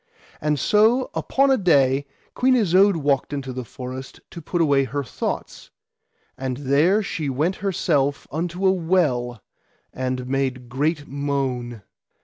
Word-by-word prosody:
And 150 -1 0
so 225 - +3
upon 275 0 +2
a 265 - +4
day 140 - +3 0.3
Queen 255 +1 +3
Isoud 195 -3 +4
walked 145 -2 0
into 135 -2 -4
the 130 0 -5
forest 130 +2 -8
to 170 - -8
put 175 +3 -3
away 140 -4 +3
her 140 +3 -3
thoughts, 125 - -5 0.7
and 130 -1 -4
there 145 +10 +2
she 155 -6 -3
went 155 +8 0
herself 150 -7 0
unto 175 +4 -3
a 190 - +6
well 150 - 0 0.5
and 130 0 -3
made 130 -2 -2
great 145 +4 -1
moan. 135 -5 -3
145 Hz, 135 wpm, -23 LUFS, 130-180 Hz, 0.7 s, a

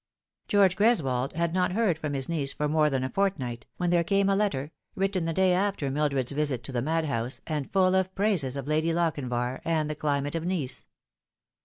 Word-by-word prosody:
George 195 -3 +4
Greswold 140 - +2
had 170 0 -1
not 180 -1 +1
heard 210 -5 +2
from 150 -2 -4
his 135 -1 -2
niece 150 -5 -1
for 150 - -1
more 150 0 +3
than 135 -2 -1
a 130 - -2
fortnight, 130 - -1
when 175 -1 0
there 170 -1 +3
came 195 +2 +2
a 195 - +3
letter, 160 -9 -1 0.2
written 195 -2 0
the 165 - 0
day 185 +2 +3
after 185 -7 0
Mildred's 140 -3 0
visit 140 -4 -1
to 135 - -5
the 120 -2 -1
madhouse, 140 -5 -1
and 150 -4 -3
full 185 -1 +3
of 190 0 +1
praises 185 -11 +1
of 140 -1 -5
Lady 155 +2 +1
Lochinvar 130 -7 -1
and 155 -2 0
the - - -1
climate 145 -1 -1
of 165 -1 -2
Nice. 165 -8 -2
155 Hz, 200 wpm, -27 LUFS, 135-185 Hz, 0.2 s, George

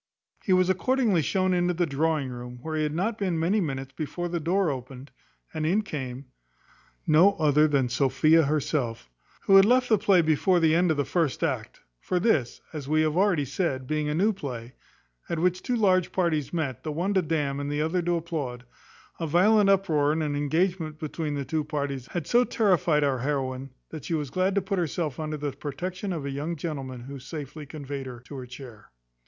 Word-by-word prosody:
He 195 - -1
was 185 0 +4
accordingly 210 0 +2
shown 185 +6 +1
into 175 0 +1
the 175 +1 +1
drawing 150 -1 0
room, 125 0 -8
where 160 -1 -4
he 155 - 0
had 150 0 -1
not 215 +6 -1
been 185 -5 0
many 190 +6 +2
minutes 135 -4 -4
before 170 +3 -4
the 170 0 -2
door 175 +1 +1
opened, 130 +1 -8 0.4
and 155 -1 -3
in 190 +8 +2
came 135 - -6 0.8
no 170 +6 +5
other 150 -2 +3
than 140 -4 +2
Sophia 140 +5 +3
herself, 140 - -1 0.3
who 195 - +6
had 195 - +9
left 250 +3 +3
the 220 -3 +4
play 195 -4 +4
before 160 +4 +3
the 160 -1 +3
end 175 +2 +3
of 160 - +1
the 145 - +1
first 165 -6 0
act; - - -3 0.2
for 180 - -1
this, 155 - +1
as 145 -4 -6
we 155 +1 +3
have 155 0 0
already 180 -6 +2
said, 135 -2 -2
being, 150 +1 -1
a 150 - -1
new 205 +6 +3
play, 125 - -7 0.6
at 170 - -1
which 180 +2 +1
two 250 - -1
large 185 -5 +2
parties 165 -6 0
met, 155 -8 -2
the 155 - -4
one 175 +7 -1
to 190 - +3
damn, 150 -4 -1
and 145 0 -3
the 145 +1 0
other 170 +3 0
to 175 0 0
applaud, 145 -8 -4 0.5
a 165 - -2
violent 200 +6 +4
uproar, 160 -7 +3
and 160 +1 0
an 145 -1 -1
engagement 160 +2 0
between 155 -1 -4
the 140 -1 -3
two 155 +1 -1
parties, 140 -4 -3
had 170 0 -4
so 240 +7 +4
terrified 180 -10 +2
our 135 -3 +1
heroine, 135 0 -2 0.2
that 155 -4 -7
she 165 - -1
was 145 -4 -3
glad 185 +4 +1
to 200 - +1
put 190 0 -1
herself 160 -4 -2
under 155 -1 -3
the 145 -1 -3
protection 180 +8 -5
of 160 -5 -4
a 140 - -3
young 150 +5 -3
gentleman 135 -6 -5
who 135 +3 -8
safely 150 +2 -8
conveyed 140 -2 -6
her 125 -2 -8
to 135 +3 -11
her 130 -2 -7
chair. 125 -4 -11
155 Hz, 205 wpm, -26 LUFS, 140-180 Hz, 0.8 s, had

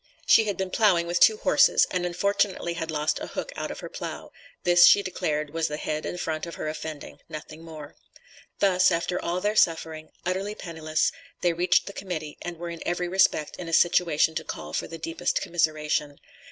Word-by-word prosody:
She 225 - +6
had 205 -2 -2
been 190 -1 -3
ploughing 185 -6 +3
with 175 +1 -1
two 435 - +6
horses, - - +4
and 180 -1 -1
unfortunately 190 -1 0
had 165 -1 -5
lost 150 -1 0
a - - -6
hook - - -5
out - - -4
of - - -7
her - - -6
plough; - - -7 0.3
this, 175 0 +7
she 200 - +6
declared 150 -5 -2
was 165 0 0
the 150 - -4
head 155 0 -3
and 180 - -5
front 160 -1 -3
of 170 - -7
her - - -5
offending, 155 -1 -7
nothing 155 0 -9
more. 155 -3 -10 0.6
Thus, 185 -2 +4
after 175 +1 -1
all 175 +2 -2
their 210 +2 0
suffering, 160 -4 +1 0.2
utterly 190 +3 -2
penniless, 160 -4 -1 0.3
they 175 -1 +2
reached 180 +2 +2
the 200 - -8
Committee, 160 -7 -5
and 175 -1 -6
were 170 +1 -6
in 170 - -8
every 175 0 -1
respect, 175 -4 +2
in 175 - -7
a - - -6
situation 165 -2 +3
to - - -3
call - - -7
for - - -2
the 165 - -8
deepest 165 +2 -2
commiseration. 150 -3 -1
170 Hz, 200 wpm, -26 LUFS, 155-180 Hz, 0.6 s, this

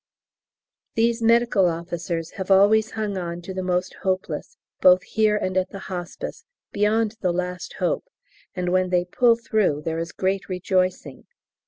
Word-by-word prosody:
These 230 +1 +2
Medical 230 -4 +4
Officers 170 0 -3
have 190 -1 -6
always 210 +3 +5
hung 210 -3 -2
on 170 -1 -4
to 190 - -6
the 185 - -3
most 180 0 -1
hopeless, 190 - -3 0.2
both 185 0 +6
here 215 -1 +2
and 185 -2 -2
at 185 0 +1
the 200 - -8 0.2
Hospice, 175 -1 -6 0.3
beyond 215 +1 +1
the 180 - +1
last 180 +1 -4
hope, - - -1 0.5
and 180 -1 -1
when 185 0 +2
they 180 -1 +2
pull 235 +6 +4
through 215 -10 0
there 165 0 -1
is 165 0 -4
great 195 +3 -2
rejoicing. 185 -5 -1
185 Hz, 155 wpm, -23 LUFS, 180-215 Hz, 0.5 s, both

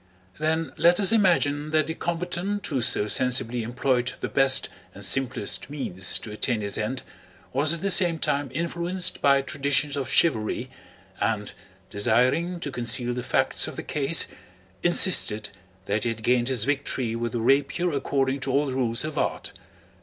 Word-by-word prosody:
Then 160 +1 -1
let 175 +3 +4
us 200 0 +4
imagine 160 -9 +2
that 155 -1 +2
the 160 - -4
combatant 175 +4 -3
who 135 -4 -2
so 105 -2 +3
sensibly 125 0 +1
employed 125 +2 -1
the - - -4
best 135 -1 +3 0.3
and 100 - -2
simplest 130 0 0
means 95 -11 0
to 110 - -9
attain 110 +1 -1
his 100 -1 -2
end 115 +4 -3 0.5
was 145 +4 +2
at 170 - -2
the 195 0 +2
same 175 -2 +5
time 145 -2 -1
influenced 170 +4 -2
by 140 -1 +4
traditions 145 0 -1
of 135 -2 -3
chivalry 130 -4 +1 0.5
and, 105 -2 -1 0.4
desiring 130 - +1
to 145 - -4
conceal 120 0 -1
the 125 - -4
facts - - +1
of - - -7
the - - -6
case, 150 +2 0 0.6
insisted 170 - +3 0.4
that 105 +1 -1
he 120 - 0
had 115 -1 -5
gained 120 0 +2
his 130 -5 +1
victory 135 -3 -1
with 115 -1 -3
the 120 - -1
rapier 140 +8 +1
according 135 -1 -1
to 135 0 -3
all 140 +3 +2
the 135 - -4
rules 120 -2 0
of 155 -1 -4
art. - - -3
135 Hz, 170 wpm, -25 LUFS, 120-160 Hz, 0.6 s, same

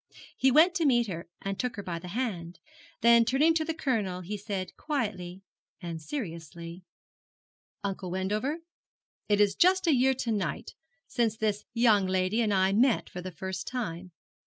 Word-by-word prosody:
He 265 - +3
went 315 +7 +6
to 345 -4 0
meet 240 -3 +4
her, 170 -4 -6
and 195 0 -3
took 250 -2 -2
her 205 - -6
by 175 -3 -4
the 180 - -9
hand; 180 -5 -3 0.4
then 235 0 +7
turning 275 +7 +3
to 320 -1 +1
the 325 0 -3
Colonel 215 - -1
he 190 +4 -5
said 200 -2 -5
quietly 195 - -3 0.4
and 170 -3 -6
seriously, 170 - -6 1.0
'Uncle 195 -2 -3
Wendover, 210 - -2 0.7
it 205 -1 +3
is 205 -1 +4
just 375 +2 +4
a 325 - +4
year 265 +1 +3
to 245 -2 -2
night 200 -7 -2 0.3
since 225 -3 0
this 210 -1 -1
young 220 -5 +4
lady 185 +4 +1
and 215 -2 +1
I 190 0 +3
met 240 +3 +2
for 180 - -6
the 185 - -5
first 190 +2 -6
time. 185 -8 -4
205 Hz, 170 wpm, -29 LUFS, 185-250 Hz, 1.0 s, then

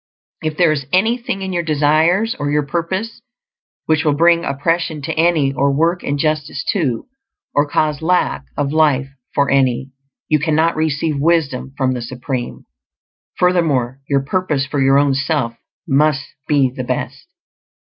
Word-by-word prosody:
If 155 -1 -3
there 175 -3 +4
is 140 -3 -2
anything 220 +1 0
in 190 -1 -4
your 175 - 0
desires 160 +7 +2
or 145 - -1
your 150 0 +1
purpose 185 +9 -3 0.6
which 155 -1 +2
will 150 -3 +2
bring 170 +2 +4
oppression 165 +2 -1
to - - -2
any, 160 -4 +2
or 140 +1 +1
work 165 +5 +1
injustice 150 +1 -1
to, 140 - -1 0.5
or 145 0 +2
cause 150 0 0
lack 175 -4 +1
of 145 0 -1
life 145 -4 +2 0.3
for 140 -1 +2
any, 135 -1 +1 0.4
you 155 - +2
cannot 160 +2 +1
receive 155 -1 -1
wisdom 140 -4 0
from 130 -2 +1
the 125 - -4
Supreme. 125 +1 -5 0.7
Furthermore, 150 -9 +1
your 140 -1 +2
purpose 150 -3 -1
for 140 0 -2
your 135 +1 +4
own 140 -1 +3
self 140 -3 -1 0.3
must 145 0 +2 0.2
be 140 -4 +3
the 130 - -4
best. - - -4
150 Hz, 150 wpm, -18 LUFS, 140-165 Hz, 0.7 s, there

